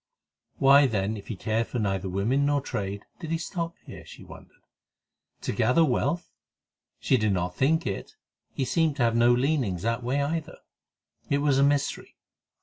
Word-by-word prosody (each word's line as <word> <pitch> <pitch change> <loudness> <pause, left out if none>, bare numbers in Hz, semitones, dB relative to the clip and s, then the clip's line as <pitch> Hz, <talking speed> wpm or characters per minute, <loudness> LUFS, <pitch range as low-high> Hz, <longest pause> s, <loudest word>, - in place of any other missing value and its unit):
Why, 140 +1 +6
then, 105 -2 -1
if 100 - -10
he 110 - -4
cared 110 +4 -1
for - - -4
neither 95 -3 -1
women 110 +10 +1
nor 145 0 +2
trade, 100 -7 -4 0.2
did 165 -3 -7
he 165 - 0
stop 170 0 -4
here? - - -10
she - - -13
wondered. - - -15 0.8
To - - -2
gather 125 +9 +3
wealth? 145 +5 -1 0.7
She 130 - +2
did 110 -3 +1
not 90 -1 -2
think 160 +5 +2
it; 95 - -5 0.4
he 135 - -2
seemed 160 0 +1
to 135 - 0
have 115 -1 +2
no 120 +1 +5
leanings 120 - 0
that 115 +2 -1
way 130 +4 0
either. 160 +2 -3 0.7
It 140 - +2
was 140 -2 +2
a - - +5
mystery. 140 0 0
130 Hz, 175 wpm, -26 LUFS, 110-145 Hz, 0.8 s, Why